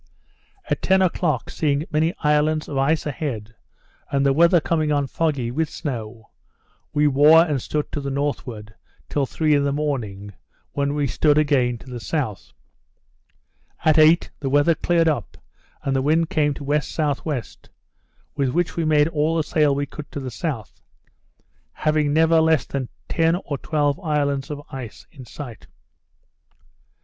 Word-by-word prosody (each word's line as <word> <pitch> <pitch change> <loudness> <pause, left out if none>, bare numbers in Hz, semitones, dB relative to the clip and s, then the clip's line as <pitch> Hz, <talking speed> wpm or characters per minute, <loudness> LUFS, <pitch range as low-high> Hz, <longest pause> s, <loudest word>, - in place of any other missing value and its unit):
At - - -1
ten 190 0 +3
o'clock, 160 -7 0
seeing 145 -1 0
many 160 +3 +1
islands 150 +1 +2
of 145 - -6
ice 155 +4 +1
a 150 - -1
head, 115 -7 -5 0.6
and 140 0 +1
the 135 - +4
weather 170 +4 +5
coming 155 -1 0
on 145 -1 +1
foggy, 140 -5 -1
with 155 +4 -1
snow, 115 -6 -6 0.6
we 150 0 +2
wore 150 +3 +6
and 145 -6 -1
stood 150 +4 -3
to 145 - -3
the 140 - -4
northward, 125 -6 -4 0.4
till 140 -2 0
three 155 +2 +1
in 145 -1 +3
the 140 - +1
morning, 115 -9 -3 0.4
when 140 0 -1
we 145 -1 0
stood 145 +3 +2
again 135 -5 +2
to - - -16
the 125 -2 -7
south. 115 -3 -3 1.3
At 155 0 +5
eight, 160 +3 +5
the 135 - -2
weather 145 +4 +4
cleared 165 0 +1
up, 155 -3 -2 0.5
and 135 -1 -1
the 135 - +2
wind 160 +5 +1
came 150 -5 +1
to - - -10
W.S.W., 145 -1 -1 0.9
with 140 -3 0
which 175 +5 -1
we 170 - -1
made 150 -1 +3
all 160 +1 0
the 160 - +1
sail 150 -3 +2
we 145 +1 -1
could 150 +1 -10
to - - -3
the 130 -2 -6
south; 135 - -5 0.9
having 155 -1 +1
never 160 +1 +4
less 160 -3 +3
than 135 -3 -4 0.2
ten 165 0 +2
or 140 -3 -4
twelve 145 -2 0
islands 145 -3 -1
of 145 -1 -6
ice 130 -4 -8
in 135 -5 -12
sight. 120 -3 -9
145 Hz, 160 wpm, -22 LUFS, 135-155 Hz, 1.3 s, wore